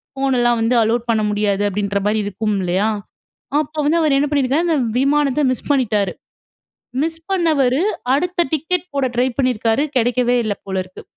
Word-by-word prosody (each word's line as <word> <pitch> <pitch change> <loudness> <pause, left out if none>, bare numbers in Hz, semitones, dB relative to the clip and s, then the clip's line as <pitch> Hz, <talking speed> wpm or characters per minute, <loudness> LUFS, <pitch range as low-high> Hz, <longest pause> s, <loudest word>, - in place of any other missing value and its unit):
ஃபோனெல்லாம் 245 -3 +1
வந்து 230 +2 +2
அலோவ் 230 +2 0
பண்ண 220 -1 +1
முடியாது, 205 -1 0
அப்பிடின்றமாரி 205 +1 -1
இருக்கும் 205 +1 -2
இல்லயா? 185 +4 +1 0.7
அப்போ 310 +1 -9
வந்து 335 +2 +3
அவரு 295 -3 +3
என்ன 290 +1 0
பண்ணியிருக்காரு, 285 +3 +1
அந்த 325 -2 +2 0.2
விமானத்த 285 0 +2
மிஸ் 255 - -8
பண்ணிட்டாரு. 215 -8 +1 0.9
மிஸ் 325 0 -3
பண்ணவரு 305 -6 +2 0.3
அடுத்த 350 +3 0
டிக்கெட் 360 +4 -2
போட 275 -2 +1
ட்ரை 250 +2 +2
பண்ணியிருக்காரு. 250 0 +1
கிடைக்கவே 245 +1 +1
இல்ல 205 - 0
போல 190 -1 -3
இருக்கு. 185 0 -13
250 Hz, 150 wpm, -19 LUFS, 215-290 Hz, 0.9 s, வந்து